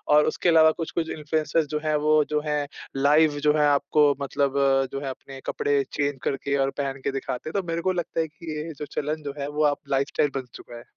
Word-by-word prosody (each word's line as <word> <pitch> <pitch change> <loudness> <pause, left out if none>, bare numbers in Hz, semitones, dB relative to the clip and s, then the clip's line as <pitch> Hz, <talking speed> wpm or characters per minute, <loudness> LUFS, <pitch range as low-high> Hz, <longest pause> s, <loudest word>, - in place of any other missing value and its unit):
और 150 - +6
उसके 175 - 0
अलावा 160 -1 +6
कुछ-कुछ 165 0 -3
इन्फ्लुएंसर्स 155 +1 0
जो 150 +1 -2
हैं, 155 -1 +1
वो 150 0 +3
जो 150 0 0
हैं 150 -1 -1 0.3
लाइव 145 +2 +4
जो 150 0 +4
है 150 -1 +4
आपको 145 +1 +3
मतलब 140 0 0 0.4
जो 135 - -2
है 140 - -3
अपने 135 +1 -9
कपड़े 140 -1 +1
चेंज 145 -2 -1
करके 140 +1 -1
और 135 0 +2
पहन 140 -1 -3
के - - 0
दिखाते 135 +1 -4
हैं। - - -9
तो 180 - -14
मेरे 165 0 -1
को 185 - +1
लगता 175 -2 -3
है 160 - -2
कि 160 +1 -9
ये 160 +2 -5
जो 150 - -4
चलन 150 +1 -3
जो 140 -1 -4
है 140 - -2
वो 150 +1 -1
अब - - -8
लाइफस्टाइल 140 +2 +1
बन 135 -1 -3
चुका 120 - -11
है। 120 - -11
150 Hz, 235 wpm, -25 LUFS, 140-155 Hz, 0.4 s, और